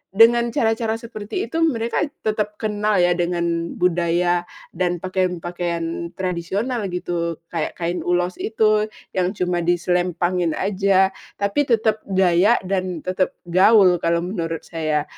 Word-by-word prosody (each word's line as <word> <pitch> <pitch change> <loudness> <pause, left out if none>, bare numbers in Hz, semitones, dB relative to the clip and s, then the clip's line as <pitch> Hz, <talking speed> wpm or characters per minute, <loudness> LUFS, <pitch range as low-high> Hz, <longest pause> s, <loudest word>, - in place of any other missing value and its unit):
dengan 235 +2 +6
cara-cara 225 -1 0
seperti 225 -2 -5
itu 325 - -1
mereka 235 -8 +1 0.2
tetap 210 -1 -1
kenal 210 0 -1
ya 175 - +4
dengan 170 -1 -1
budaya 175 0 +1 0.2
dan 180 0 0
pakaian-pakaian 175 -2 -2
tradisional 190 +6 -2
gitu, 175 -2 -2 0.2
kayak 165 -2 -3
kain 175 +1 -2
ulos 175 +1 -1
itu 215 -1 +2 0.2
yang 185 +2 -1
cuma 180 -2 0
diselempangin 175 0 0
aja, 195 -1 +2 0.2
tapi 205 +8 0
tetep 220 -2 +2
gaya 190 +2 +4
dan 185 -3 -2
tetep 185 0 -1
gaul 185 +1 +5
kalau 170 0 +1
menurut 165 -3 -3
saya. 155 -3 -1
180 Hz, 125 wpm, -21 LUFS, 175-210 Hz, 0.2 s, dengan